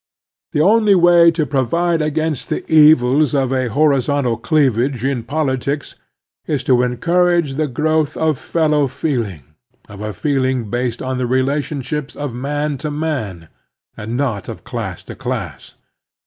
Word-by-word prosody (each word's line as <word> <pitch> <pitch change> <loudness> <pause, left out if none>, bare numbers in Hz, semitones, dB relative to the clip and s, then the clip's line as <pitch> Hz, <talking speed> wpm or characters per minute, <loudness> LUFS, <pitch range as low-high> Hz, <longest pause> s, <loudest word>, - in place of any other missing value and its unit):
The 150 - +2
only 210 +3 +4
way 175 -1 +6
to 165 -2 0
provide 160 +5 0
against 155 -4 -2
the - - -2
evils 150 -2 +5
of 135 -1 +1
a 130 -1 0
horizontal 140 -2 +1
cleavage 130 -1 +1
in 135 -3 0
politics 140 0 -2 0.5
is 150 -4 -1
to 125 -2 +3
encourage 170 +4 +1
the 155 +2 -1
growth 155 +3 0
of 155 -4 0
fellow 150 -3 +1
feeling, 120 - -3 0.4
of 105 -1 -11
a 105 0 -3
feeling 130 -1 -1
based 120 -1 -2
on 130 0 -3
the 125 - -1
V - - -5
relations 140 +2 -2
of 145 -4 -5
man 145 +3 -3
to 155 - -3
man, 140 - -4 0.5
and 110 +3 -5
not 120 -9 -2
of 115 - -8
class 115 -7 -5
to - - -9
class. - - -6
140 Hz, 150 wpm, -18 LUFS, 125-155 Hz, 0.5 s, way